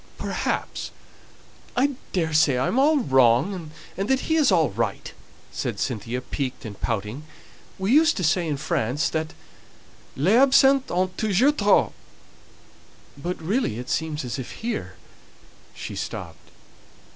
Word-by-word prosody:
"Perhaps. -, -, -3 dB, 0.9 s
I 275 Hz, +3 st, +3 dB, 0.2 s
daresay 155 Hz, -6 st, +2 dB
I'm 135 Hz, -, +1 dB
all 300 Hz, +3 st, +4 dB
wrong, 140 Hz, -, +2 dB, 0.3 s
and 195 Hz, +3 st, -3 dB
that 265 Hz, 0 st, +2 dB
he 320 Hz, -, 0 dB
is 300 Hz, -8 st, +4 dB
all 160 Hz, -, +3 dB
right," 105 Hz, 0 st, -3 dB, 0.4 s
said -, -, -4 dB
Cynthia, 120 Hz, 0 st, -3 dB
piqued 130 Hz, -1 st, -4 dB
and 105 Hz, -3 st, -9 dB
pouting. 110 Hz, +4 st, -3 dB, 0.6 s
"We 190 Hz, +3 st, -1 dB
used 320 Hz, +4 st, +5 dB
to 185 Hz, -, -2 dB
say 170 Hz, +2 st, +2 dB
in 150 Hz, -2 st, -1 dB
France, 135 Hz, 0 st, -1 dB
that 160 Hz, 0 st, -3 dB, 0.8 s
'les 165 Hz, +10 st, +2 dB
absens 270 Hz, 0 st, +5 dB
ont 185 Hz, +1 st, -1 dB
toujours 220 Hz, +7 st, +3 dB
tort,' 205 Hz, -1 st, +3 dB, 1.2 s
but 175 Hz, +6 st, -4 dB
really 170 Hz, -, -1 dB
it 125 Hz, +1 st, -6 dB
seems 155 Hz, -3 st, -2 dB
as 120 Hz, +1 st, -4 dB
if 130 Hz, -, -7 dB
here 95 Hz, -, -3 dB, 0.4 s
" -, -, -27 dB
she -, -, -7 dB
stopped. -, -, -7 dB
160 Hz, 135 wpm, -24 LUFS, -, 1.2 s, used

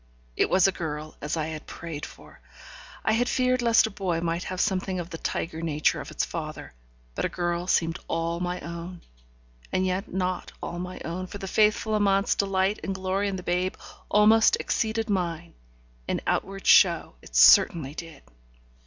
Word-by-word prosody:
It -, -, +2 dB
was 185 Hz, 0 st, +5 dB
a -, -, +2 dB
girl, 155 Hz, -3 st, -5 dB
as 150 Hz, +3 st, -2 dB
I 155 Hz, -, -1 dB
had 155 Hz, -1 st, -7 dB
prayed 155 Hz, -3 st, -6 dB
for. -, -, -16 dB, 0.6 s
I -, -, +3 dB
had 245 Hz, +2 st, +1 dB
feared 255 Hz, -1 st, +1 dB
lest 230 Hz, -1 st, +5 dB
a 220 Hz, -, -4 dB
boy 185 Hz, -4 st, -2 dB
might 170 Hz, +1 st, -2 dB
have 185 Hz, -1 st, -4 dB
something 190 Hz, -2 st, 0 dB
of 175 Hz, 0 st, -6 dB
the 165 Hz, -, -6 dB
tiger 160 Hz, 0 st, -3 dB
nature 155 Hz, -2 st, +1 dB
of -, -, -9 dB
its -, -, -1 dB
father, -, -, -6 dB, 0.4 s
but -, -, -3 dB
a -, -, +1 dB
girl 175 Hz, 0 st, -2 dB
seemed 165 Hz, -2 st, +1 dB
all 165 Hz, +1 st, -2 dB
my 180 Hz, 0 st, -2 dB
own. 170 Hz, +1 st, -7 dB, 0.7 s
And 185 Hz, -, +1 dB
yet 185 Hz, +1 st, -2 dB
not 185 Hz, 0 st, -2 dB
all 175 Hz, -, -5 dB
my 180 Hz, +1 st, -6 dB
own, 180 Hz, +3 st, -4 dB
for 205 Hz, -, -8 dB
the 195 Hz, -, -6 dB
faithful 215 Hz, +2 st, +2 dB
Amante's 200 Hz, -2 st, +3 dB
delight 195 Hz, +1 st, 0 dB
and 195 Hz, -, -3 dB
glory 190 Hz, +2 st, -1 dB
in 195 Hz, -, -2 dB
the 180 Hz, -, -6 dB
babe 180 Hz, +1 st, -1 dB, 0.3 s
almost 215 Hz, +2 st, +5 dB
exceeded 225 Hz, 0 st, -1 dB
mine; 175 Hz, -4 st, -2 dB, 0.5 s
in -, -, -1 dB
outward 195 Hz, 0 st, -2 dB
show 170 Hz, -4 st, +5 dB
it -, -, -14 dB
certainly 135 Hz, -, +6 dB
did. 165 Hz, 0 st, -9 dB
180 Hz, 180 wpm, -26 LUFS, 170-195 Hz, 0.7 s, certainly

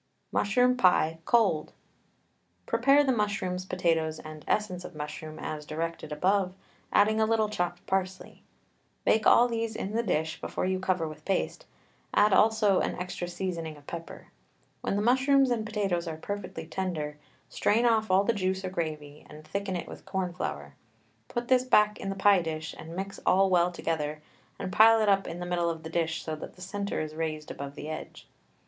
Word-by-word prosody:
MUSHROOM 250 Hz, +4 st, +3 dB
PIE, 165 Hz, -6 st, +3 dB
COLD. 200 Hz, -10 st, +2 dB, 0.9 s
Prepare 280 Hz, +1 st, +4 dB
the 270 Hz, -, +2 dB
mushrooms, 200 Hz, -5 st, -1 dB
potatoes, 165 Hz, -4 st, 0 dB
and 155 Hz, -1 st, -10 dB
essence 185 Hz, -4 st, 0 dB
of -, -, -9 dB
mushroom 155 Hz, +1 st, -6 dB
as 150 Hz, -1 st, -5 dB
directed 160 Hz, +1 st, -4 dB
above, 185 Hz, +4 st, +1 dB, 0.4 s
adding 215 Hz, +2 st, +4 dB
a -, -, +5 dB
little 220 Hz, -1 st, +2 dB
chopped 175 Hz, -4 st, -3 dB
parsley. 190 Hz, -1 st, -3 dB, 0.6 s
Bake 220 Hz, -, +3 dB
all 240 Hz, -, +7 dB
these 230 Hz, -1 st, -2 dB
in 195 Hz, -, -4 dB
the 230 Hz, -, +2 dB
dish 160 Hz, -6 st, -1 dB
before -, -, -2 dB
you 185 Hz, 0 st, 0 dB
cover 185 Hz, -3 st, 0 dB
with 155 Hz, 0 st, -10 dB
paste, 195 Hz, -, -2 dB, 0.5 s
add 210 Hz, -1 st, +5 dB
also 215 Hz, -3 st, +4 dB
an -, -, -1 dB
extra 180 Hz, 0 st, -4 dB
seasoning 170 Hz, -4 st, -4 dB
of 145 Hz, -, -18 dB
pepper. 165 Hz, +1 st, -8 dB, 0.5 s
When -, -, -1 dB
the 205 Hz, -, 0 dB
mushrooms 265 Hz, +2 st, +4 dB
and 225 Hz, -2 st, -1 dB
potatoes 195 Hz, -5 st, -1 dB
are 160 Hz, -1 st, -4 dB
perfectly 185 Hz, -2 st, -5 dB
tender, 160 Hz, -5 st, -3 dB, 0.3 s
strain 225 Hz, +4 st, +2 dB
off 220 Hz, -2 st, +3 dB
all 190 Hz, +1 st, +4 dB
the 235 Hz, -, +2 dB
juice 190 Hz, -1 st, -1 dB
or 185 Hz, -, -3 dB
gravy, 155 Hz, -4 st, -4 dB
and 155 Hz, 0 st, -12 dB
thicken 200 Hz, -1 st, -3 dB
it 175 Hz, -, -4 dB
with -, -, -10 dB
corn 190 Hz, -2 st, -2 dB
flour; 70 Hz, -, -5 dB, 0.5 s
put 240 Hz, 0 st, -4 dB
this 255 Hz, -1 st, +4 dB
back 210 Hz, -4 st, +3 dB
in 195 Hz, -, -4 dB
the 195 Hz, -, -2 dB
pie 195 Hz, -1 st, +5 dB
dish 160 Hz, -1 st, -4 dB
and 165 Hz, +1 st, -8 dB
mix 195 Hz, +2 st, -5 dB
all 190 Hz, +1 st, +4 dB
well 175 Hz, 0 st, +4 dB
together, 155 Hz, -3 st, -3 dB, 0.3 s
and 185 Hz, -, -5 dB
pile 225 Hz, +2 st, +7 dB
it 215 Hz, -1 st, +2 dB
up 195 Hz, -1 st, +3 dB
in 165 Hz, -, -6 dB
the 175 Hz, -, -4 dB
middle 175 Hz, -1 st, 0 dB
of 165 Hz, -1 st, -5 dB
the 160 Hz, -, -7 dB
dish 165 Hz, -1 st, -1 dB
so 155 Hz, -, -3 dB
that -, -, -9 dB
the 185 Hz, -, -16 dB
centre 200 Hz, +2 st, -3 dB
is 155 Hz, 0 st, -5 dB
raised 155 Hz, -1 st, -4 dB
above 140 Hz, 0 st, -7 dB
the 150 Hz, -, -7 dB
edge. 155 Hz, 0 st, -7 dB
185 Hz, 185 wpm, -28 LUFS, 160-210 Hz, 0.9 s, all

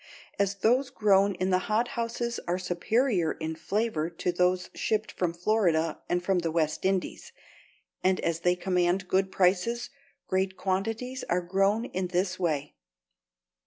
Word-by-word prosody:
As 200 Hz, -1 st, +1 dB
those 245 Hz, +7 st, +2 dB
grown 200 Hz, -2 st, +3 dB
in 185 Hz, +1 st, -1 dB
the 185 Hz, -, +4 dB
hothouses 235 Hz, +1 st, -1 dB
are 175 Hz, +1 st, +1 dB
superior 185 Hz, +1 st, +1 dB
in 160 Hz, 0 st, -4 dB
flavor 200 Hz, -5 st, -1 dB
to 175 Hz, +1 st, -2 dB
those 180 Hz, +1 st, +1 dB
shipped 215 Hz, 0 st, -1 dB
from 180 Hz, -2 st, -1 dB
Florida 170 Hz, -3 st, +1 dB
and 175 Hz, 0 st, 0 dB
from 190 Hz, 0 st, +2 dB
the 170 Hz, -1 st, -1 dB
West 160 Hz, 0 st, -1 dB
Indies, 195 Hz, -, -1 dB, 0.7 s
and 185 Hz, 0 st, +3 dB
as 165 Hz, -1 st, -1 dB
they 180 Hz, +1 st, +2 dB
command 180 Hz, 0 st, 0 dB
good 190 Hz, +1 st, +1 dB
prices, 200 Hz, +7 st, +1 dB, 0.3 s
great 190 Hz, 0 st, -1 dB
quantities 225 Hz, +7 st, -2 dB
are 180 Hz, +1 st, +2 dB
grown 195 Hz, +5 st, +1 dB
in 185 Hz, -5 st, -3 dB
this 185 Hz, +1 st, -1 dB
way. 150 Hz, -5 st, -1 dB
185 Hz, 145 wpm, -28 LUFS, 175-215 Hz, 0.7 s, the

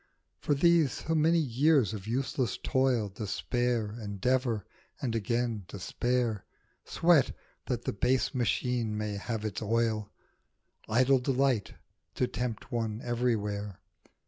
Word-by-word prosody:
For 145 Hz, -, +1 dB
these, 165 Hz, -1 st, +4 dB
so 160 Hz, -, 0 dB
many 160 Hz, +2 st, +4 dB
years 140 Hz, -, +3 dB
of 105 Hz, -1 st, -7 dB
useless 130 Hz, +1 st, -1 dB
toil, 130 Hz, -5 st, +1 dB
Despair, 105 Hz, +4 st, -1 dB
endeavour, 110 Hz, +2 st, 0 dB, 0.3 s
and 125 Hz, -4 st, -2 dB
again 115 Hz, -1 st, -1 dB
despair, 115 Hz, +2 st, -1 dB, 0.4 s
Sweat, 165 Hz, -6 st, +3 dB, 0.3 s
that 120 Hz, -2 st, -2 dB
the -, -, -1 dB
base 125 Hz, +8 st, +1 dB
machine 120 Hz, -3 st, 0 dB
may 105 Hz, -1 st, -2 dB
have 110 Hz, +1 st, -4 dB
its 105 Hz, -1 st, -3 dB
oil, 110 Hz, -1 st, 0 dB, 0.8 s
Idle 130 Hz, +4 st, +4 dB
delight 130 Hz, -4 st, +1 dB, 0.4 s
to 125 Hz, -, +2 dB
tempt 125 Hz, -3 st, -4 dB
one 115 Hz, -2 st, -2 dB
everywhere. 105 Hz, -5 st, -1 dB
120 Hz, 120 wpm, -30 LUFS, 105-130 Hz, 0.8 s, these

